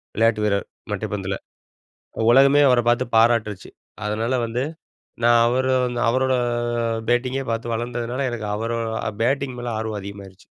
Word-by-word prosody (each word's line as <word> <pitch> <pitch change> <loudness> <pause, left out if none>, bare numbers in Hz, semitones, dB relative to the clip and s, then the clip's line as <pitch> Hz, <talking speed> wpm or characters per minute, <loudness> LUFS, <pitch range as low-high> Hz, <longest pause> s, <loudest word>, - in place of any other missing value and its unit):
விளையாட்டு 110 -1 +2
வீரர், 100 -1 0 0.3
மட்டைப்பந்துல. 95 -1 -3 1.0
உலகமே 140 +3 +6
அவர 125 -1 +4
பார்த்து 120 +1 +3
பாராட்டுருச்சு. 110 -3 +2 0.3
அதனால 110 +4 -1
வந்து, 120 +3 -2 0.6
நான் 120 0 +6
அவரு 130 +2 +1
வந்து 120 -1 -2
அவரோட 130 +2 +2 0.8
பேட்டிங்கே 130 +2 0
பார்த்து 115 +1 -2
வளர்ந்ததுனால, 120 +3 -3
எனக்கு 110 -3 -4
அவரோ 115 +1 -2 0.4
பேட்டிங் 130 +1 0
மேல 120 -1 -4
ஆர்வம் 110 -2 -3
அதிகமாயிருச்சு. 100 -1 -10
120 Hz, 125 wpm, -22 LUFS, 110-125 Hz, 1.0 s, உலகமே